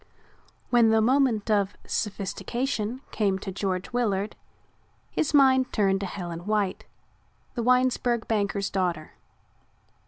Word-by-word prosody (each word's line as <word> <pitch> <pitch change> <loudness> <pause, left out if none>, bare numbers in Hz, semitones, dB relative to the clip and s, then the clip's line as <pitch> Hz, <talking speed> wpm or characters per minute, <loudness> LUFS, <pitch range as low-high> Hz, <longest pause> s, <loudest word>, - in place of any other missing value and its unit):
When 235 -2 +5
the 220 0 +4
moment 235 -2 +2
of 200 -1 +1
sophistication 230 +4 -3
came 200 -3 +1
to 190 0 -6
George 190 +3 -3
Willard 210 -4 0 0.8
his 310 - 0
mind 265 -3 +4
turned 195 -2 +2
to 195 - -3
Helen 175 -1 -6
White, 210 -3 0 0.7
the 240 - -2
Winesburg 250 -1 +2
banker's 200 -2 -1
daughter. 175 -5 -1
210 Hz, 115 wpm, -26 LUFS, 195-245 Hz, 0.8 s, When